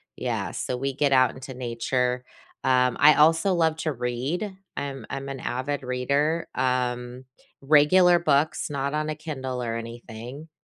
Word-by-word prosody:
yeah, - - -3
so 125 - -3
we 135 +2 -2
get 140 +1 +1
out 130 -1 +5
into 130 0 -9
nature. 125 +1 -1 0.4
Um, 125 -1 +3
I 150 +1 +7
also 165 +5 +4
love 160 -2 +2
to 160 -1 -2
read. 135 - -3 0.2
I'm 135 -5 -5
I'm 135 0 -5
an 135 -1 -5
avid 135 +4 -3
reader, 140 +6 0
um, 125 0 -1 0.4
regular 170 +5 +5
books, 155 0 +1
not 140 0 -2
on 155 0 -1
a 155 - -2
Kindle 130 -5 -5
or 115 -1 -2
anything. 120 +5 -8
135 Hz, 150 wpm, -25 LUFS, 125-150 Hz, 0.4 s, I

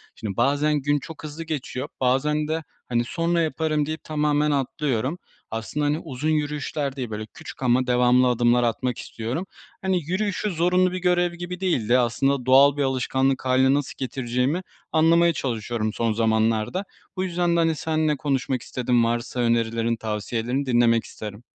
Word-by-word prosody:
Şimdi, 100 -4 -5
bazen 145 +4 +2
gün 145 +1 +1
çok 160 +4 -10
hızlı 155 +2 -6
geçiyor 150 -5 -4
bazen 150 +4 +1
de, 160 +1 -2 0.3
hani, 120 -1 +1
"Sonra 170 +4 0
yaparım." 155 -1 0
deyip 155 +2 -5
tamamen 150 -1 +1
atlıyorum. 140 0 -1 0.3
Aslında, 115 +7 -2
hani, 150 +2 +1
uzun 150 -1 -3
yürüyüşler 150 -2 -1
değil, 130 -4 -4
böyle, 110 0 -5
küçük 160 -3 -10
ama 125 +1 +2
devamlı 125 +1 +4
adımlar 120 0 +3
atmak 120 +1 -1
istiyorum. 120 +11 -4 0.4
Hani, 190 -2 +1
yürüyüşü 200 +5 -1
zorunlu 180 +2 +2
bir 185 - -3
görev 175 -1 +2
gibi 175 +1 -6
değil 170 - 0
de, 125 +1 +5
aslında 125 +2 +1
doğal 135 +2 +6
bir 145 - +1
alışkanlık 130 0 0
hâline 130 +1 +4
nasıl 145 -1 -1
getireceğimi 130 +4 -1 0.3
anlamaya 170 +2 +4
çalışıyorum 115 -5 -2
son 115 -1 0
zamanlarda. 110 - +1 0.3
Bu 185 - 0
yüzden 175 -1 0
de, - - +3
hani, 165 -1 +2
seninle 155 -1 0
konuşmak 135 -3 -1
istedim, 120 0 +1
varsa 120 +2 -2
önerilerin, 115 -1 +1
tavsiyelerini 115 +4 -2
dinlemek 120 -2 +3
isterim. 105 +1 -9
135 Hz, 160 wpm, -24 LUFS, 120-155 Hz, 0.4 s, doğal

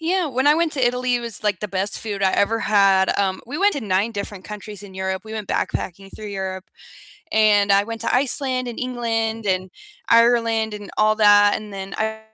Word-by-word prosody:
yeah, 350 +2 0
when 260 -1 -1
I 295 - +6
went 330 -1 0
to 265 -3 +1
Italy, 250 +1 +1
it - - -4
was, 230 -3 -2
like, 205 -4 0
the 210 - -4
best 195 +1 -2
food 205 -3 -5
I 190 -1 +3
ever 225 +3 +1
had. 195 -3 +3
Um, 190 -1 0
we 280 +5 -5
went 410 +1 +3
to 285 - -3
9 200 0 0
different 200 -2 -6
countries 210 -1 -8
in 200 -2 -11
Europe. 190 0 -3
We 220 - -9
went 215 -3 -6
backpacking 195 +2 -3
through 215 - -8
Europe, 190 -2 -5 0.7
and 205 -2 +4
I 200 +1 +4
went 230 0 -6
to - - 0
Iceland 255 -1 0
and 235 - -7
England 225 -3 -2
and 185 -1 -1 0.4
Ireland 230 -2 +3
and 205 -1 -9
all 215 0 +3
that, 205 -1 +6
and 215 -1 -9
then 195 0 -7
I 220 0 -2
215 Hz, 215 wpm, -21 LUFS, 200-235 Hz, 0.7 s, I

